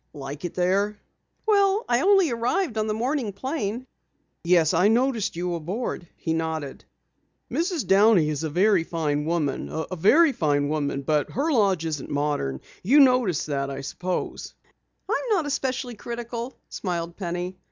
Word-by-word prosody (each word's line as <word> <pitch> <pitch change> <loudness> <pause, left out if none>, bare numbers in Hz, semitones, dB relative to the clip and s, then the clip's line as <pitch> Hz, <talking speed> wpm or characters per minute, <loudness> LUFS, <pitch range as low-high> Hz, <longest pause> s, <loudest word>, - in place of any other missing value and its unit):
"Like 145 +2 -7
it 175 - -5
there?" 195 +3 +1 0.5
"Well, 405 0 +3
I 240 +1 +2
only 385 -5 +4
arrived 240 - 0
on 215 0 0
the 215 - 0
morning 245 -1 -1
plane." 245 +1 -3 0.6
"Yes, 170 -1 +4
I 180 +4 +4
noticed 235 -2 +1
you 175 +1 -2
aboard," 175 +3 -4
he 160 - -2
nodded. 160 -3 -3 0.7
"Mrs. 340 -2 -1
Downey 195 -4 +5
is 150 0 -3
a 160 - -1
very 185 +3 +3
fine 150 -3 -1
woman, 160 -4 -1
a 160 +3 -4
very 285 - +5
fine 145 - +1
woman, 145 -2 -1
but 150 +1 +1
her 295 +6 0
lodge 195 - +2
isn't 150 -4 -4
modern. 145 - -1 0.2
You 265 +11 +5
noticed 250 - +4
that, 140 -2 -2
I 135 0 -5
suppose?" 180 +6 -4 0.5
"I'm 480 +3 -1
not 380 -8 +2
especially 260 -3 -2
critical," 235 +2 -6
smiled 170 -3 -4
Penny. 180 0 -4
190 Hz, 150 wpm, -25 LUFS, 160-250 Hz, 0.7 s, Downey